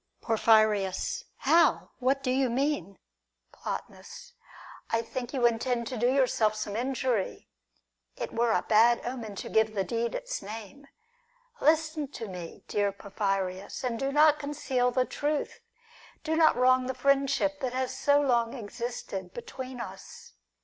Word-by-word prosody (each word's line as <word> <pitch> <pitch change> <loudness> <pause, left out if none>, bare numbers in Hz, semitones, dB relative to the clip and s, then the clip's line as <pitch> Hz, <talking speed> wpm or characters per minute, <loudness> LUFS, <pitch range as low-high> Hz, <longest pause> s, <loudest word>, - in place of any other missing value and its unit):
Porphyrius. 220 - +2
How! 330 -1 +3
What 270 +2 +1
do 255 - +1
you 260 0 +2
mean? 240 - -1 0.5
Plotinus. - - -7 0.6
I 230 0 +1
think 245 +1 -5
you 255 -4 +1
intend 235 +1 +1
to 255 - -4
do 240 +2 +3
yourself 245 -5 +2
some 210 -1 -4
injury; 245 -3 -1 0.7
it - - -5
were 235 0 +2
a - - +2
bad 230 +2 +4
omen 235 -4 -5
to - - -6
give 220 0 +2
the 195 - +1
deed 235 +2 -2
its - - -4
name. 225 +7 -9 0.7
Listen 310 -1 +2
to 225 - -6
me, 180 -3 -8
dear 205 -1 +1
Porphyrius, 195 -1 -3
and 235 -3 -2
do 270 0 -1
not 300 +1 +5
conceal 270 -4 0
the 255 +1 +1
truth. 295 +2 -2 0.6
Do 320 0 0
not 320 -1 +5
wrong 255 0 +4
the 260 - -3
friendship 280 +1 +2
that 255 -3 -2
has 260 0 -2
so 285 0 +3
long 240 -4 +1
existed 210 -5 -6
between 255 +1 -7
us. 195 -4 -9
245 Hz, 145 wpm, -28 LUFS, 215-275 Hz, 0.7 s, not